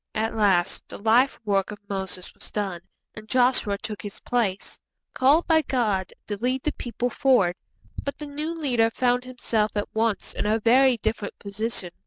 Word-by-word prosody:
At 220 +1 0
last 200 -5 +1
the - - -7
life 230 +6 +3
work 195 -2 +1
of 210 - -6
Moses 190 -2 -4
was - - -10
done, 195 -5 -3 0.3
and 215 0 -11
Joshua 245 -5 +3
took 210 -2 -6
his 205 0 -7
place, 225 -6 -1 0.3
called 285 +6 +4
by 320 -1 +4
God 220 - 0
to 205 - -4
lead 255 +4 -1
the 305 - +1
people 245 0 -3
forward. 230 -12 +3 0.5
But 280 - -4
the 300 - -6
new 295 +3 -4
leader 255 -9 +1
found 245 +1 +1
himself 225 -4 -1
at 205 - -3
once 220 -1 0
in - - -2
a 220 +1 +2
very 250 +3 +5
different 220 -1 -3
position. 200 -2 -3
225 Hz, 175 wpm, -25 LUFS, 205-255 Hz, 0.5 s, very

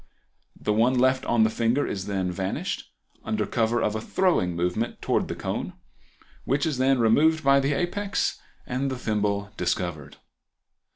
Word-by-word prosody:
The 105 - 0
one 120 +4 +3
left 130 +1 +3
on 120 -2 +3
the 110 - +3
finger 115 +6 +1
is 95 0 -4
then 95 -3 -1
vanished, 95 +1 -3 0.3
under 110 -1 -1
cover 115 0 0
of 105 - +1
a 110 - -2
throwing 140 - +1
movement 90 +7 -1
towards - - 0
the - - -4
cone, - - -4 0.7
which 140 +2 0
is 150 -6 -1
then 135 +1 +3
removed 150 +8 +3
by 140 0 +5
the 140 +1 +1
apex 195 +5 -1 0.3
and 130 +2 -2
the 130 - -3
thimble 105 -3 -1
discovered. 85 -5 -2
115 Hz, 160 wpm, -25 LUFS, 100-135 Hz, 0.7 s, by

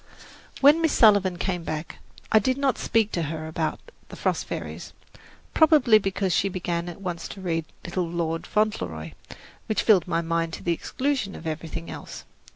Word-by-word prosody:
When 295 +4 +7
Miss 320 -2 +2
Sullivan 200 -5 +5
came 180 -1 -2
back, 155 0 -5 0.3
I 220 - +7
did 255 +5 0
not 275 -2 +1
speak 220 -2 +1
to 170 - -1
her 155 0 -5
about 160 0 -2 0.3
"The - - -9
Frost - - -1
Fairies," - - -6 0.6
probably 295 -9 +6
because 195 -2 -1
she 195 - +2
began 175 -2 -3
at 175 - -10
once 175 -3 -4
to - - -9
read 165 -4 -2 0.2
"Little 180 0 -2
Lord 165 -1 -2
Fauntleroy," 90 - -1 0.6
which 215 - 0
filled 195 -7 +4
my 170 -1 0
mind 165 0 -1
to - - -7
the 170 - +1
exclusion 255 - -2
of - - -10
everything 165 +1 -5
else. - - -9
180 Hz, 170 wpm, -25 LUFS, 165-215 Hz, 0.6 s, When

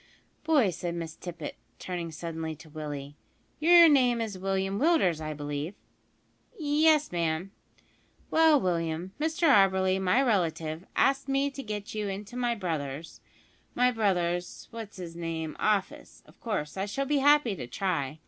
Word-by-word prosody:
"Boy," 295 - +3
said 170 0 -4
Miss 165 -2 -5
Tippet, 170 -4 -7 0.2
turning 175 -2 -5
suddenly 160 0 -5
to 155 +1 -15
Willie, 145 -2 -6 0.4
"your 340 +2 +8
name 250 -5 +4
is 220 -3 -3
William 195 +1 -1
Willders, 230 - +3
I 155 -1 -4
believe?" 145 +4 -4 0.8
"Yes, 305 0 +3
ma'am." 170 +2 -1 0.8
"Well, 320 -2 +5
William, 170 -2 -2
Mr 320 +2 +1
Auberly, 190 -5 +4
my 190 +6 +3
relative, 165 - -1
asks 275 +1 +2
me 275 +1 +1
to 275 - -7
get 210 -4 -6
you 210 -1 -2
into 200 +4 -6
my 240 -1 0
brother's 160 -6 -5 0.5
my 250 +1 +4
brother's, 180 -6 -1
what's 225 -3 -8
'is 170 -2 -7
name 165 -2 -4
office. 210 -3 -1
Of - - -21
course, 190 -9 -3
I 195 +2 -1
shall 275 +7 -2
be 290 +1 +1
happy 290 -6 +4
to 125 - -7
try. 155 -1 -2
190 Hz, 150 wpm, -28 LUFS, 165-250 Hz, 0.8 s, your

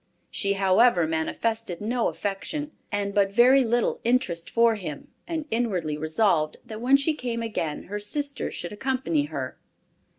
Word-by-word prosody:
She 200 -1 0
however 195 -1 +4
manifested 175 +5 -2
no 235 +3 0
affection, 290 +10 -3 0.2
and 200 -1 -1
but 200 -1 +3
very 255 +5 +6
little 240 0 0
interest 225 -9 +1
for 230 0 +4
him, 175 -9 -6 0.2
and 325 -3 -3
inwardly 190 -10 0
resolved 155 0 +1
that 220 -2 -8
when 265 +3 +5
she 280 +3 +1
came 240 -5 -3
again 165 -9 -3
her 205 +2 -5
sister 280 +7 -2
should 175 - -5
accompany 210 - 0
her. 140 -4 -5
210 Hz, 145 wpm, -26 LUFS, 175-245 Hz, 0.2 s, very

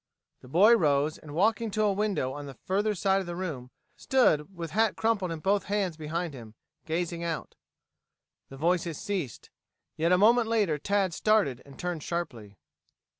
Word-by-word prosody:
The - - -14
boy 200 - +6
rose 150 -5 +1
and 150 -1 -10
walking 220 +5 +2
to 215 +1 0
a 205 -1 +3
window 195 -10 -1
on 145 0 -7
the 135 - -9
further 205 - -1
side 195 +1 +2
of 185 - -7
the 175 - -4
room, 155 -9 -5 0.3
stood 190 - +2
with 165 -2 -5
hat 220 +1 +2
crumpled 210 -6 0
in 160 -2 -5
both 200 +3 +1
hands 200 -4 -1
behind 160 +1 -4
him, 115 -4 -11 0.3
gazing 170 +1 -2
out. 165 -2 -4 1.0
The 135 - -10
voices 170 0 0
ceased. 180 - -4 0.5
Yet 165 +2 +1
a 180 - +6
moment 230 +4 +5
later 205 -10 +1
Tad 195 +1 0
started 200 - +2
and 140 - -14
turned 175 -3 -3
sharply. 120 - -5
175 Hz, 175 wpm, -28 LUFS, 150-205 Hz, 1.0 s, boy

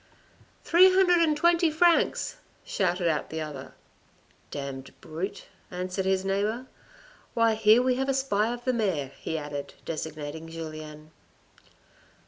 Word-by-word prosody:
" - - -31
Three 365 +3 +6
hundred 370 -2 +4
and 310 -2 +3
twenty 340 +1 +4
francs," 335 +2 +2 0.3
shouted 180 -2 0
out 155 -2 0
the 160 - -4
other. 150 -4 -7 0.4
" - - -35
Damned 140 -2 -7
brute," 170 +5 -5 0.3
answered 185 +1 -3
his 190 0 +1
neighbour. 210 +6 -1 0.3
" - - -26
Why 230 -1 +4
here 220 +2 +5
we 255 -1 +1
have 270 +1 -1
a - - +3
spy 230 -5 +1
of 240 0 -6
the 255 - +2
mayor," 185 - -1
he 160 - -3
added, 145 -2 -6
designating 155 0 -5
Julien. 155 -1 -8
190 Hz, 145 wpm, -27 LUFS, 155-260 Hz, 0.4 s, Three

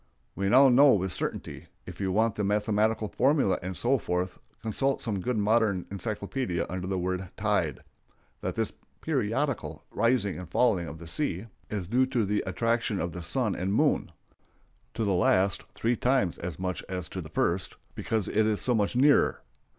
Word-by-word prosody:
We 100 0 -1
now 135 +5 +7
know 135 +2 +7
with 95 -2 0
certainty—if 75 - -6
you 95 -1 0
want 110 +3 +2
the 105 - -2
mathematical 105 +2 +1
formulæ 135 -3 +2
and 90 0 -5
so 130 +2 +2
forth, 90 -1 -2 0.2
consult 135 +5 0
some 105 -5 -2
good 125 +3 -1
modern 105 -3 +2
encyclopædia 100 0 -2
under 90 0 -4
the 95 0 -1
word 90 0 -2
tide—that - - -4
this - - -1 0.3
periodical - - -1
rising 105 -7 +1
and 90 -3 -8
falling 105 -9 +2
of 80 +2 -7
the 85 - -10
sea 95 - -2 0.2
is 100 -4 -3
due 125 +5 +2
to 120 -4 0
the 105 +1 0
attraction 115 -3 0
of 85 +1 -2
the 90 - -7
sun 105 +5 0
and 95 +3 -1
moon,—to 115 - -3
the 100 - +2
last 95 +2 +3
three 120 +2 0
times 125 -8 +1
as 90 -3 -5
much 90 -1 -3
as 90 -3 -3
to - - -5
the - - -9
first, 90 +2 0 0.2
because 110 -4 -1
it 110 0 +2
is 105 -2 +1
so 125 - +1
much 105 0 +1
nearer. 140 +3 +4
105 Hz, 170 wpm, -28 LUFS, 90-120 Hz, 0.3 s, now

